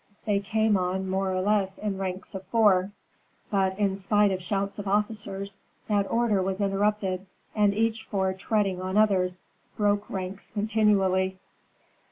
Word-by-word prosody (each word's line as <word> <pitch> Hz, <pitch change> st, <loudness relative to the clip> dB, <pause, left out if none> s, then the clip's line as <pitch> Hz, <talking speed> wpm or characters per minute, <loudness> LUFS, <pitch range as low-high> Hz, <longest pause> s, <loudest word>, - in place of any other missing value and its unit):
They 205 Hz, -2 st, +2 dB
came 215 Hz, +1 st, +2 dB
on 185 Hz, +1 st, -1 dB
more 190 Hz, 0 st, 0 dB
or 185 Hz, 0 st, 0 dB
less 195 Hz, -1 st, +1 dB
in 205 Hz, -2 st, -3 dB
ranks 190 Hz, -1 st, -4 dB
of 190 Hz, -1 st, -6 dB
four; 195 Hz, -3 st, +3 dB, 0.6 s
but 190 Hz, -2 st, +1 dB
in 200 Hz, -2 st, +1 dB
spite 205 Hz, +1 st, +2 dB
of 185 Hz, -1 st, -2 dB
shouts 200 Hz, +2 st, -2 dB
of 205 Hz, -, -5 dB
officers, 200 Hz, -1 st, -2 dB, 0.3 s
that 205 Hz, -2 st, +1 dB
order 230 Hz, -4 st, +2 dB
was 190 Hz, +1 st, -2 dB
interrupted, 195 Hz, -1 st, 0 dB, 0.3 s
and 210 Hz, -2 st, +3 dB
each 220 Hz, +2 st, 0 dB
four 190 Hz, -3 st, -1 dB
treading 195 Hz, -1 st, 0 dB
on 185 Hz, +2 st, -2 dB
others, 185 Hz, -4 st, +2 dB, 0.3 s
broke 205 Hz, 0 st, +1 dB
ranks 190 Hz, 0 st, -5 dB
continually. 200 Hz, -3 st, +2 dB
195 Hz, 150 wpm, -27 LUFS, 190-210 Hz, 0.6 s, four